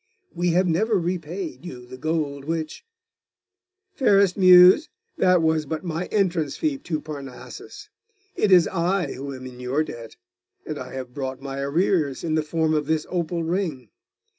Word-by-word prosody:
We 175 +1 -1
have 180 +2 +3
never 205 +6 +2
repaid 170 -3 -4
you 125 -9 -9
the 125 - -10
gold 140 -1 -2
which 160 0 -4 0.5
' 380 0 -60
'Fairest 200 - +3
Muse, 185 - +7 0.3
that 180 -2 +4
was 160 -2 +1
but 160 +3 -4
my 170 0 -3
entrance 175 -8 0
fee 300 -3 -1
to 165 - -3
Parnassus. 140 -5 -9 0.5
It 210 - +1
is 180 -2 +7
I 180 -3 -1
who 140 +2 -6
am 130 0 -9
in 125 -1 -10
your 130 +5 0
debt; 115 -6 -9 0.5
and - - -5
I - - -8
have 130 -2 -7
brought 130 -1 -4
my 135 0 -6
arrears, 145 0 0
in 165 -2 -1
the 155 - +2
form 160 +1 0
of 150 -2 0
this 160 -1 0
opal 170 -1 -2
ring. 160 - -2
160 Hz, 165 wpm, -24 LUFS, 140-180 Hz, 0.5 s, Muse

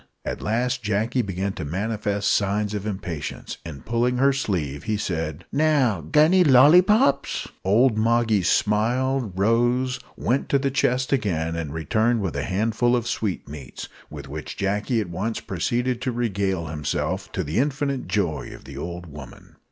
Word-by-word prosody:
At - - -4
last 125 +4 0
Jacky 110 +4 0
began 95 -2 -3
to 80 - -6
manifest 100 +4 -1
signs 105 +1 0
of 105 0 -3
impatience, 85 -7 -5
and, 70 -6 -9
pulling 120 +2 +1
her 135 +2 +4
sleeve, 85 - -2
he 110 -1 0
said 80 -4 -3
"Now, 140 - +2
g'anny, 155 - +4
lollipops!" 150 - +5 0.2
Old 110 +4 +3
Moggy 115 -2 +2
smiled, 115 +3 +1
rose, 120 +5 +2 0.2
went 130 +4 0
to 140 - +4
the 135 0 -1
chest 130 0 +1
again, 80 -10 0
and 80 -3 -4
returned 110 +10 +1
with 95 -6 -3
a 70 - -1
handful 110 +5 +1
of 120 -2 -1
sweetmeats, 75 - -4 0.2
with 70 -2 -9
which 75 +2 -7
Jacky 105 +5 0
at 105 - -4
once 105 +6 -2
proceeded 120 +6 -1
to 130 - -1
regale 100 -7 -1
himself, 75 -2 -3
to - - -1
the 80 +9 -1
infinite 140 -1 -1
joy 85 -9 -1
of - - -15
the 70 0 -10
old 85 +2 -6
woman. 75 -5 -12
105 Hz, 155 wpm, -24 LUFS, 90-125 Hz, 0.2 s, lollipops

